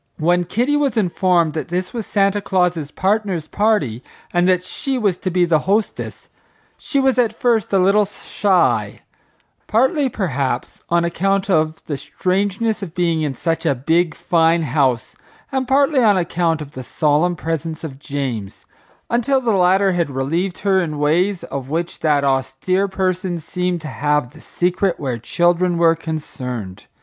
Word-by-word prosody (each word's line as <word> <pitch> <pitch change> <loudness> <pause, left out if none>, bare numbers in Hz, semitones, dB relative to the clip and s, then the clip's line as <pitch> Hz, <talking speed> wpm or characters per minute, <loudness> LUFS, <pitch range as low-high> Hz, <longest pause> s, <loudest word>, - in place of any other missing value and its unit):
When 175 +2 +2
Kitty 245 - 0
was 280 -6 0
informed 180 -4 +2
that 155 - -4
this 180 +2 -3
was 230 -3 -4
Santa 200 0 +1
Claus's 180 -6 0
Partner's 190 -2 -1
party, 155 - 0 0.3
and 175 +1 +3
that 180 -1 +2
she 270 +7 -3
was 200 -7 0
to 185 - -2
be 180 0 +2
the 165 -2 +3
hostess, 210 +2 -1 0.5
she 280 - -2
was 265 -2 +2
at 235 -3 +2
first 230 -5 +1
a 195 - +3
little 200 +3 +4
shy, 175 - 0 0.7
partly, 265 - +2
perhaps, 145 - -3
on 170 0 +2
account 195 +3 0
of 155 -2 0
the 145 - -3
strangeness 200 +8 -1
of 175 -4 -7
being 170 -3 +1
in 145 -3 -2
such 165 +4 -1
a 140 - +2
big, 160 +5 +1
fine 165 0 +2
house, 130 -5 0 0.4
and 265 -2 -1
partly 275 +1 +3
on 210 -4 +4
account 170 -2 0
of 145 - -13
the 130 - -7
solemn 150 +6 +1
presence 165 0 -4
of 135 -4 -7
James, 135 -9 -5 0.4
until 245 +3 +1
the 240 -3 0
latter 190 0 +3
had 175 -4 0
relieved 165 +8 -2
her 190 -1 +4
in 155 -4 -3
ways 170 +6 +1
of 135 -1 -6
which 165 +3 -3
that 150 -3 +2
austere 135 +8 0
person 185 -2 -1
seemed 180 +2 -3
to 155 - -7
have 145 -2 0
the 160 +1 -15
secret 180 +1 -1
where 130 -5 -3
children 175 +7 +1
were 165 -1 +4
concerned. 125 - -6
175 Hz, 160 wpm, -19 LUFS, 155-195 Hz, 0.7 s, little